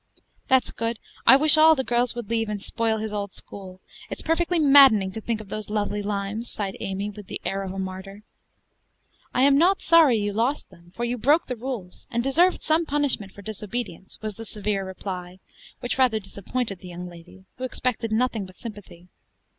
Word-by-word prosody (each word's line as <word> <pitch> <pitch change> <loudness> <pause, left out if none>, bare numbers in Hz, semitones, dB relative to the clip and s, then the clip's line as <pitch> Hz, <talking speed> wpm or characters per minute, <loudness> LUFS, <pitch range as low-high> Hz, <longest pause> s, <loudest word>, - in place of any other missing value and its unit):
"That's 260 -1 +3
good! 230 0 -3 0.3
I 260 - +10
wish 305 +3 +6
all 320 0 +7
the 265 - -1
girls 245 0 +1
would 240 -3 -5
leave, 225 -1 -1
and 210 -1 -3
spoil 225 -1 0
his 215 0 -4
old 200 -1 -3
school. 185 -2 -9 0.3
It's - - -6
perfectly 340 +2 +1
maddening 270 -10 +6
to 220 - -7
think 225 0 -2
of 215 -2 -11
those 215 +1 -5
lovely 210 -1 -1
limes," 205 +3 -3
sighed 200 -2 -4
Amy 195 +2 -3
with 205 -1 -11
the - - -5
air 195 0 -1
of 190 -1 -5
a 195 - -7
martyr. 190 +2 -6 1.1
"I 255 - +2
am 280 0 +5
not 370 +4 +3
sorry 325 -7 +6
you 205 -1 -1
lost 235 +5 -1
them, 175 -1 -19
for 240 - -2
you 245 +1 -2
broke 295 +8 +3
the 250 - -4
rules, 230 -7 -6
and 235 0 -1
deserved 335 +8 +3
some 320 +1 +2
punishment 280 -9 +1
for 200 - -13
disobedience," 210 -2 -5
was 215 -2 -4
the 225 - -7
severe 210 -2 -2
reply, 185 -1 -7 0.4
which 245 +2 -3
rather 245 -4 +3
disappointed 200 +1 -4
the 185 - -11
young 180 0 -7
lady, 175 +2 -14
who - - -5
expected 250 -3 -2
nothing 220 -3 0
but 185 - -16
sympathy. 205 -6 -10
220 Hz, 195 wpm, -24 LUFS, 195-255 Hz, 1.1 s, I